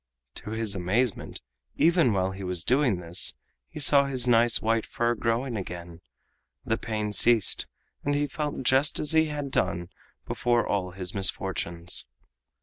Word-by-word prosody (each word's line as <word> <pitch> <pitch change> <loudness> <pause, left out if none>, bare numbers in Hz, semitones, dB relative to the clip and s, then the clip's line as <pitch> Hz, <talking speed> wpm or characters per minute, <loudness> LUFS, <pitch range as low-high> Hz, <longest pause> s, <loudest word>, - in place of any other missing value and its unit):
To - - -9
his 110 -2 -1
amazement, 100 +5 -1 0.3
even 165 -6 +4
while 95 -2 0
he 95 +1 -8
was 90 -2 -2
doing 125 -4 +2
this, 85 0 -3 0.3
he - - -8
saw 140 -1 +5
his 130 -3 0
nice 120 -1 +4
white 115 0 +1
fur 120 0 -1
growing 120 +2 -1
again, 85 -3 -7 0.6
the 110 - +1
pain 105 -2 -3
ceased, 115 -1 +3 0.4
and 145 0 0
he 145 0 +1
felt 145 -2 -4
just 130 +4 +3
as 150 - +1
he 160 0 +4
had 145 -3 -4
done 90 -5 -1 0.4
before 120 -1 +1
all 95 -3 -1
his 90 0 -6
misfortunes. 90 -3 0
115 Hz, 150 wpm, -27 LUFS, 95-130 Hz, 0.6 s, saw